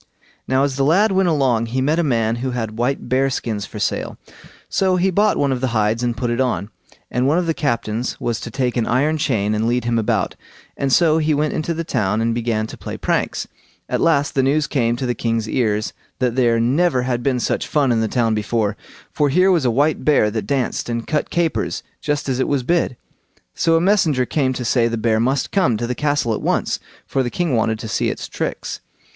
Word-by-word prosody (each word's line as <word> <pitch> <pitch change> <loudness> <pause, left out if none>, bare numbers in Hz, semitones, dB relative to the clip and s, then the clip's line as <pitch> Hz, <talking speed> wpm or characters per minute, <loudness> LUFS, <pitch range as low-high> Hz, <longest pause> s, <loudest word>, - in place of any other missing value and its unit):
Now 130 +1 +2
as 140 -1 -1
the 135 - +2
lad 190 +9 +4
went 190 -1 +2
along 130 -7 +1
he 125 +3 -2
met 150 +5 +1
a - - +2
man 115 -5 +1
who 130 +2 -2
had 115 -3 -3
white 135 +3 -1
bear 135 +1 +2
skins 110 -5 -3
for 105 - -9
sale, 105 - -2 0.5
so 190 -1 +1
he 185 +1 +2
bought 205 +3 +2
one 140 -1 +1
of 130 -2 -1
the 130 - +1
hides 110 +2 +1
and 120 -1 -1
put 120 +1 -1
it 120 +2 0
on; 115 -5 -1 0.4
and 125 +2 +1
one 150 +4 +3
of 180 - +1
the 165 - +1
captains 115 -4 -2
was 120 -1 -2
to 120 - -6
take 125 +1 -1
an 115 - 0
iron 150 +6 +1
chain 110 -8 0
and 110 +1 0
lead 120 +1 +1
him 120 -1 +1
about, 110 - 0 0.4
and 135 -1 -1
so 160 +1 +4
he 155 -1 +1
went 150 +1 0
into 160 +2 -2
the 165 - -2
town 110 -9 0
and 115 +1 +1
began 115 -2 -1
to - - -9
play - - -6
pranks. - - -1 0.4
At - - -1
last 155 -3 +2
the 135 - +2
news 145 +3 +2
came 120 -6 0
to 130 - -3
the 120 - 0
king's 115 -1 -1
ears, 110 -3 0 0.2
that 125 -2 0
there 120 -3 +3
never 130 +3 +2
had 125 -1 -1
been 125 0 0
such - - -1
fun 140 -4 +2
in 115 -1 +2
the 110 - +1
town 115 0 +1
before, 105 0 0 0.4
for 145 -1 +1
here 185 +7 +4
was 165 -7 +2
a - - +4
white 145 +6 +1
bear 140 -8 +3
that 110 0 -3
danced 135 -4 -1
and 115 -1 -2
cut 150 - -1
capers 170 -2 -1 0.2
just 145 -1 -1
as 130 -1 -1
it - - +1
was 140 -3 0
bid. 165 -3 0 0.6
So 165 - +2
a - - +4
messenger 165 -8 +2
came 130 -1 0
to 125 -1 -4
say 115 0 +2
the 115 0 -2
bear 110 0 +1
must 130 +3 0
come 155 - +2
to 120 - -2
the 125 - -2
castle 145 -4 0
at - - -3
once, - - 0 0.3
for 135 - 0
the 125 - -1
king 165 -1 -1
wanted 110 -1 +1
to 110 - -7
see - - 0
its - - -5
tricks. - - -4
125 Hz, 235 wpm, -20 LUFS, 115-150 Hz, 0.6 s, lad